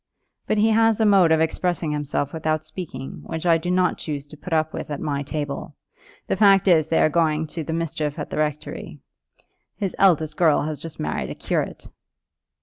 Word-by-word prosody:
"But 215 - +1
he 220 +2 +4
has 225 0 +3
a 220 - +3
mode 195 -5 +5
of 160 0 +4
expressing 165 0 0
himself 145 -1 -2
without 155 -1 -1
speaking, 155 -5 -7
which 160 +1 -5
I 165 -1 +4
do 175 - -4
not 180 0 +1
choose 145 -3 -4
to 145 - -13
put 170 +4 -10
up 160 -1 +1
with - - -5
at 145 - -4
my 145 -2 -2
table. 145 0 -5 0.5
The - - 0
fact 195 -1 +5
is 160 -4 +5
they 165 - +3
are - - +5
going 155 -1 +1
to 165 0 -4
the 155 - -5
mischief 160 -2 -2
at 150 - -5
the - - -4
rectory. 150 0 -3 0.8
His 195 -3 -2
eldest 160 -5 +3
girl 160 -5 +4
has 155 -1 -4
just 165 -2 -8
married 75 0 -2
a - - -6
curate." - - -3
160 Hz, 200 wpm, -23 LUFS, 150-180 Hz, 0.8 s, mode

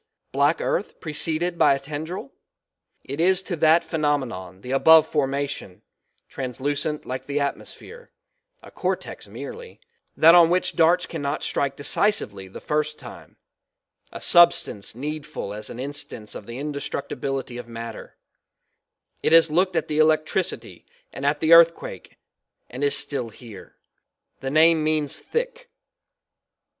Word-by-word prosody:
Black - - +2
earth - - -2
preceded 165 +2 -1
by - - +5
a - - -5
tendril? 150 +2 -6 0.7
It 140 +3 -6
is 185 +2 +3
to 185 - -3
that 160 +2 +4
phenomenon 130 - -2
the 125 - -7
above 160 +3 +6
formation, 140 - -3 0.4
translucent 145 +4 -3
like 130 +1 -6
the 145 +1 -1
atmosphere 450 - -6 0.5
a - - -13
cortex - - -4
merely 470 0 -9 0.4
that 165 +2 +7
on 170 -2 +7
which 180 +1 0
darts 175 +2 +3
cannot 145 -3 -4
strike 140 -1 -1
decisively 140 - -1
the 95 - -10
first 150 0 -2
time, - - -12 0.7
a - - -8
substance 170 -12 +4
needful 145 -6 -5
as 105 +1 -7
an 120 - -8
instance 135 -5 -6
of 100 - -9
the 120 +1 -7
indestructibility 140 -3 -4
of 120 - -9
matter; 115 -1 -9 1.0
it - - +1
has 165 -1 +6
looked 180 +3 +1
at - - 0
the 150 0 -1
electricity 155 0 0 0.3
and 140 +1 -3
at 145 0 0
the 160 +1 +5
earth 165 0 +8
quake - - -10 0.5
and 130 +3 -5
is 145 - +4
still 140 -5 -2
here; 110 -3 -13 0.6
the 135 - -4
name 160 +2 +4
means 155 -2 0
thick. - - -4
150 Hz, 135 wpm, -23 LUFS, 135-165 Hz, 1.0 s, earth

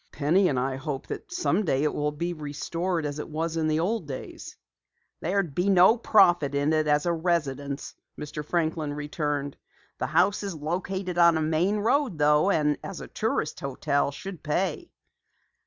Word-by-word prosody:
"Penny 165 +6 +2
and 135 - -1
I 130 +1 -1
hope 135 0 -4
that 410 - -6
someday 200 - +1
it 150 - +1
will 150 0 -1
be 170 +4 -3
restored 165 +3 -3
as 145 0 -4
it - - -6
was 160 +1 -2
in 160 -1 0
the 155 0 +1
old 185 0 -1
days." 135 -2 -8 0.6
"There 185 +5 -1
would 175 -8 0
be 180 +6 +1
no 190 +3 +6
profit 175 - +4
in 145 +2 +1
it 155 -1 +1
as 150 +1 +2
a 170 - +2
residence," 145 -5 -2 0.2
Mr. 150 0 -6
Franklin 160 -2 -1
returned. 145 -1 -3 0.4
"The - - -1
house 200 +3 +2
is 200 -4 -4
located 180 +3 -3
on 170 -1 +6
a - - 0
main 165 +6 +1
road 230 - +1
though, 150 +4 +4
and 150 -5 +2
as 195 - -6
a - - -8
tourist 215 -8 -2
hotel, 140 +1 0
should 185 +3 -8
pay." 190 - -2
160 Hz, 175 wpm, -26 LUFS, 150-185 Hz, 0.6 s, no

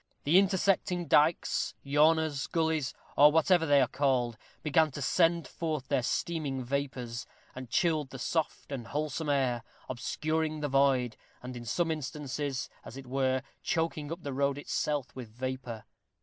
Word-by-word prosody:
The 165 +6 +6
intersecting 190 -2 +1
dykes, 155 +3 +2
yawners, 150 0 +3
gullies, 160 -4 0 0.2
or 145 +1 +8
whatever 165 +1 +3
they 145 -1 +6
are 130 - +3
called, 125 -3 +1 0.3
began 155 +1 +3
to - - -5
send 165 +4 +2
forth 155 -6 -3
their 140 -3 +2
steaming 140 0 -2
vapors, 125 -2 -3 0.3
and 130 -2 -8
chilled 155 - +1
the 135 - -8
soft 155 +3 -2
and 125 -4 -5
wholesome 150 +2 -2
air, 130 -4 +1 0.3
obscuring 155 +5 -2
the 145 - -1
void, 135 -3 +2 0.3
and 125 0 -6
in 120 -1 -7
some 165 +7 0
instances, 145 -2 -3 0.2
as 125 - -10
it 135 - -8
were, 130 0 0 0.2
choking 160 -2 -1
up 170 +1 -6
the 140 - -4
road 140 +1 +1
itself 145 -1 -2
with 125 -4 -7
vapor. 125 -1 -5
145 Hz, 150 wpm, -30 LUFS, 130-160 Hz, 0.3 s, or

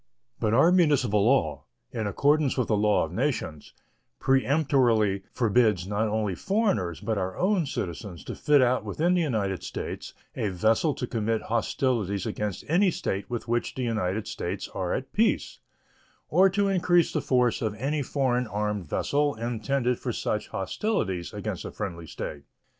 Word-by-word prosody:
But 110 +1 +1
our 160 +8 +6
municipal 145 - +3
law, 80 - +2 0.3
in 110 -2 -2
accordance 145 +6 +2
with 125 - 0
the 110 - +3
law 105 -2 +3
of 80 - -10
nations, 115 - -2 0.5
peremptorily 130 -6 +2
forbids 110 -5 +2
not 105 +3 0
only 105 -2 -1
foreigners, 105 - 0
but 110 -3 -1
our 95 0 -3
own 185 -4 +1
citizens, 85 - -5
to - - -6
fit 145 -3 +4
out 125 +1 +2
within 175 +3 0
the 180 - +2
United 105 - -1
States - - -6 0.2
a 105 - -1
vessel 110 - +2
to - - -3
commit 115 -1 -1
hostilities 110 -4 0
against 105 -3 -3
any 185 +5 +4
state 100 - -3
with 120 -1 -4
which 120 +1 -1
the 130 - -3
United 110 -3 -1
States - - -4
are - - -3
at - - -3
peace, - - +1 0.7
or 185 +4 +5
to 200 +1 +1
increase 175 -3 +3
the 155 - 0
force 125 -4 +2
of 110 -2 -1
any 140 +6 -1
foreign 125 -3 0
armed 105 -3 -2
vessel 145 - +1
intended 120 +2 -1
for - - -3
such - - -2
hostilities 95 - -2
against - - -4
a - - -5
friendly 85 -1 -6
state. 75 -1 -6
115 Hz, 160 wpm, -27 LUFS, 100-145 Hz, 0.7 s, our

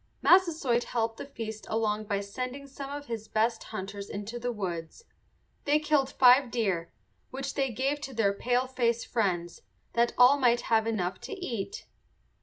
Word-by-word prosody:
Massasoit 320 -10 +4
helped 225 -1 -1
the - - -7
feast 220 -5 -7
along 215 -1 0
by 200 -1 -1
sending 255 +7 -5
some 275 0 -8
of 285 0 -6
his 225 -4 -5
best 225 +1 0
hunters 200 -1 -6
into 210 +4 -5
the 245 +1 -2
woods. 180 - -5 0.6
They 290 +1 +4
killed 300 -3 +2
five 255 0 +6
deer, 195 -8 -1 0.4
which 270 +1 -4
they 270 -2 0
gave 270 +5 -1
to 270 - -6
their 205 -3 +2
paleface 245 0 0
friends, 175 -6 -1 0.3
that 235 0 +2
all 255 +3 +7
might 240 -2 +3
have 220 0 +4
enough 190 -5 -2
to - - -6
eat. 365 - -5
235 Hz, 160 wpm, -29 LUFS, 215-270 Hz, 0.6 s, all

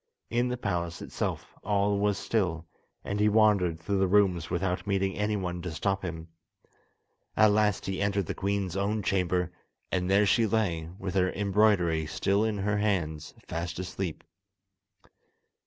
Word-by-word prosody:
In 120 +1 +2
the 125 0 -2
palace 85 -7 -2
itself - - -4
all 100 0 +1
was 105 -1 +1
still, 85 -8 -1 0.4
and 100 - -3
he 105 0 +4
wandered 100 -6 +3
through 95 +4 -1
the 95 - +3
rooms 90 -4 +2
without 90 +1 -1
meeting 95 -2 0
anyone 100 -4 -2
to 90 - -4
stop 95 +4 -1
him. 80 -2 -5 1.1
At 110 -1 +6
last 105 -1 +2
he 95 0 -3
entered 100 -1 +1
the - - -3
queen's 100 -2 -2
own 100 +2 -1
chamber, 90 -2 0 0.4
and 90 0 0
there 100 +2 +4
she 110 +3 +3
lay, 90 -8 0
with 95 -1 -4
her 95 -1 +2
embroidery 100 -6 +2
still 100 +6 +1
in 110 -2 0
her 100 +1 0
hands, 85 -8 -1
fast 85 0 -4
asleep. 90 -2 -4
95 Hz, 155 wpm, -28 LUFS, 90-105 Hz, 1.1 s, At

